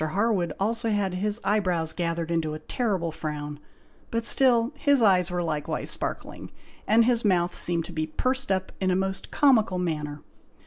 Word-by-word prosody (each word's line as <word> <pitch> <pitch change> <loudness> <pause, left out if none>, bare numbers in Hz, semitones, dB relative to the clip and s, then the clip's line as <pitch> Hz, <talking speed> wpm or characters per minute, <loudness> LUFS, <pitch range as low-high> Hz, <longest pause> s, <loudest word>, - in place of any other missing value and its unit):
Harwood 185 +1 0
also 225 +3 0
had 205 -3 0
his 205 +4 -1
eye 210 +2 +2
brows 170 -5 -1
gathered 170 -1 -2
into 160 -2 -1
a - - -7
terrible 195 -9 -1
frown, 150 -2 -5 0.5
but 230 0 -2
still 240 -2 +4
his 285 -2 +3
eyes 190 -5 +4
were 175 0 -2
likewise 150 -3 -1
sparkling, - - -3 0.4
and 225 +2 +5
his 240 -1 +1
mouth 180 -4 +2
seemed 170 -2 +1
to - - -10
be 155 0 -2
pursed 260 +9 -1
up 190 0 -1
in 190 - +1
a 180 - +2
most 190 +1 -2
comical 230 -9 +3
manner. 150 -4 -3
185 Hz, 175 wpm, -26 LUFS, 165-225 Hz, 0.5 s, and